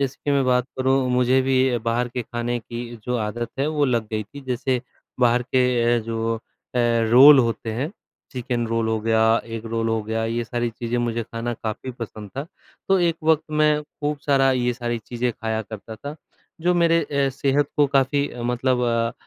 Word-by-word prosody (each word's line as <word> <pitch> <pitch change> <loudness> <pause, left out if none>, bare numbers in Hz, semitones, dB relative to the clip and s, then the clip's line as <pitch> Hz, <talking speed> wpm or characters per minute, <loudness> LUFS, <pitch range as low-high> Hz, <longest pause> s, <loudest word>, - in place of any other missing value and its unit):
जैसे 140 0 -1
कि 145 - 0
मैं 140 -1 +3
बात 125 -1 +2
करूँ 130 0 +2
मुझे 125 +1 +3
भी 130 -1 +2
बाहर 120 +1 0
के 125 0 -4
खाने 120 +1 -3
की 120 +1 -7
जो 125 0 -1
आदत 115 +2 -3
है 140 - +1
वो 150 -2 +1
लग 120 -4 0
गई 110 -1 -1
थी, 140 +8 -12
जैसे 130 -1 -1 0.4
बाहर 120 0 +4
के 125 -2 +2
अ, - - +2
जो 115 0 -2 0.4
अ, - - +1 0.3
रोल 140 +4 +9
होते 115 -2 0
हैं 140 - -3 0.4
चिकन 120 -2 -2
रोल 115 0 0
हो 110 0 +1
गया, 110 0 +2 0.2
एग 115 0 -6
रोल 115 0 -1
हो 110 -1 0
गया 110 +1 -2
ये 115 +1 -2
सारी 120 +1 -2
चीज़ें 120 +1 -3
मुझे 120 -1 -1
खाना 115 +1 -4
काफ़ी 110 +4 -5
पसंद 110 -4 -8
था, 140 - -1 0.5
तो 195 -1 +4
एक 170 -1 +2
वक़्त 160 -1 +4
मैं 150 0 +2
खूब 150 0 -4
सारा 135 -2 +4
ये 125 -1 +1
सारी 120 -1 -3
चीज़ें 120 +2 -2
खाया 110 0 -3
करता 110 +1 -9
था, 145 +6 -7 0.5
जो 180 +2 +2
मेरे 170 -1 +4
अ, 140 -1 0
सेहत 140 +2 +1
को 145 -1 +5
काफ़ी 140 +1 +1
अ, 120 - -8
मतलब 125 +1 0
अ 115 -1 +1
120 Hz, 200 wpm, -23 LUFS, 115-135 Hz, 0.5 s, रोल